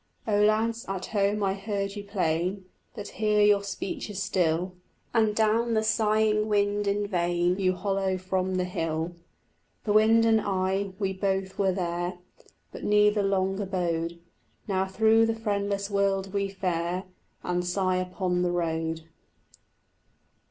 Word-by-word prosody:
Oh 205 -1 +2
lads, 225 +2 +2
at 190 -1 -3
home 205 0 0
I 190 -1 +1
heard 200 0 -3
you 205 - -6
plain, 185 -1 -1 0.3
But 205 -3 -6
here 210 -1 +2
your 205 -1 +5
speech 200 +1 -5
is 200 -2 -5
still, 180 -2 0 0.4
And 220 -3 +2
down 225 +2 +2
the 220 - +2
sighing 215 -1 +2
wind 205 -1 +1
in 205 +1 +1
vain 175 -1 0
You 185 -1 +2
hollo 195 0 -1
from 185 0 -1
the 180 - +1
hill. 165 -1 -2 0.7
The 210 - 0
wind 220 +2 +5
and 220 -1 +4
I, 190 0 -1
we 195 -2 -1
both 190 0 -2
were 195 -1 +3
there, 175 -1 -2 0.5
But - - -9
neither 210 0 +4
long 195 0 0
abode; 170 -4 -2 0.5
Now 190 -1 0
through 220 +3 +4
the 225 - 0
friendless 200 -2 -2
world 195 -1 0
we 200 -1 0
fare 180 -1 -2 0.4
And 180 0 -1
sigh 185 +1 0
upon 180 0 -1
the 180 -1 +1
road. 165 -2 -1
195 Hz, 145 wpm, -27 LUFS, 185-210 Hz, 0.7 s, your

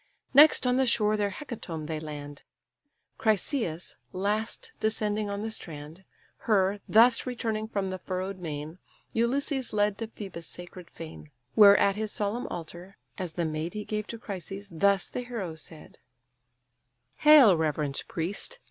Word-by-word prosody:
Next 295 0 +7
on 250 0 +3
the 265 -1 +3
shore 215 -2 +3
their 205 -1 0
hecatomb 190 - -6
they 155 0 -3
land; 145 -2 -8 0.8
Chryseïs 215 - 0 0.2
last 215 - -2
descending 215 -1 0
on 200 +1 -3
the 220 - -3
strand. 160 -1 -7 0.4
Her, 200 -2 +3
thus 230 +3 +5
returning 225 -3 -2
from 200 -3 -2
the 185 - -5
furrow'd 185 +1 -4
main, 155 0 -6 0.3
Ulysses 265 +3 0
led 205 -1 +1
to 225 - -3
Phœbus' 190 -6 -8
sacred 175 0 -8
fane; 160 -2 -10 0.2
Where 205 -2 +8
at 200 0 +3
his 215 -1 -2
solemn 215 +4 -1
altar, 175 +3 -8 0.2
as 180 -3 -2
the 170 0 -1
maid 155 +4 -3
He 210 - -4
gave 215 0 -3
to 230 - -6
Chryses, 200 -1 -7
thus 200 +3 +3
the - - -4
hero 230 -9 -5
said: 160 0 -9 1.2
"Hail, 295 -10 +8
reverend 150 -3 -1
priest! 195 - -4
200 Hz, 150 wpm, -28 LUFS, 170-220 Hz, 1.2 s, Where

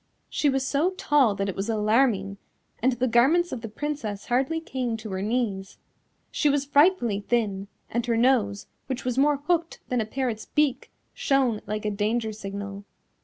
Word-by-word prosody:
She 295 - +2
was 265 -1 0
so 300 +8 +1
tall 275 - +3
that 195 0 -2
it 195 - -3
was 195 +3 -3
alarming, 215 -2 +2 0.4
and 260 +3 +3
the 245 +2 0
garments 280 +10 +3
of 240 - -4
the 225 - -6
Princess 220 -5 -4
hardly 265 +6 +1
came 255 -7 -3
to 220 -2 -8
her 190 0 -3
knees. 205 -3 -2 0.5
She 295 - +2
was 285 0 +1
frightfully 285 - +3
thin, 205 -3 -1 0.2
and 235 +1 -1
her 230 -1 +1
nose, 225 -5 +2 0.2
which 260 -1 -4
was 250 +1 0
more 290 +1 +4
hooked 330 +3 -1
than 250 -2 +1
a - - -2
parrot's 240 -3 -3
beak, 295 -4 0 0.2
shone 260 -6 +1
like 215 0 -3
a 210 - 0
danger 220 +2 -1
signal. 200 -1 -6
240 Hz, 175 wpm, -26 LUFS, 210-275 Hz, 0.5 s, more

